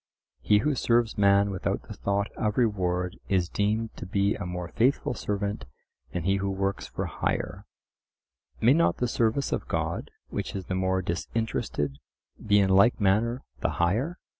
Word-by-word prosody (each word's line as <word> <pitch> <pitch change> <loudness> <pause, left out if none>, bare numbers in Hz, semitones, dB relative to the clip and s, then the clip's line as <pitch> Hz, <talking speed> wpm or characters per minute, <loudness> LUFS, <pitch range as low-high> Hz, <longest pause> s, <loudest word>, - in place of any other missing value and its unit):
He 105 - +4
who 150 - +3
serves 120 -3 +2
man 100 0 +4
without 95 - -2
the - - -9
thought 100 +1 -1
of 105 -1 -1
reward 90 -5 0
is 90 -3 +2
deemed 110 +3 -1
to - - -7
be 100 +1 +2
a 100 - -5
more 90 -1 -4
faithful 125 +5 +1
servant 100 -2 -3 0.5
than 90 - -3
he 95 +2 +2
who 100 0 -1
works 95 0 -2
for - - -4
hire. - - -3 0.9
May 120 +4 +5
not 170 +2 +3
the 125 - 0
service 115 +3 +1
of - - -2
God, - - -2 0.2
which - - -4
is 95 -2 -4
the - - -3
more 95 0 +1
disinterested, 85 -6 -2 0.4
be 105 -1 +4
in 95 -1 +3
like 100 +5 +5
manner 110 +5 +2 0.2
the - - -1
higher? 115 - 0
100 Hz, 165 wpm, -27 LUFS, 95-115 Hz, 0.9 s, May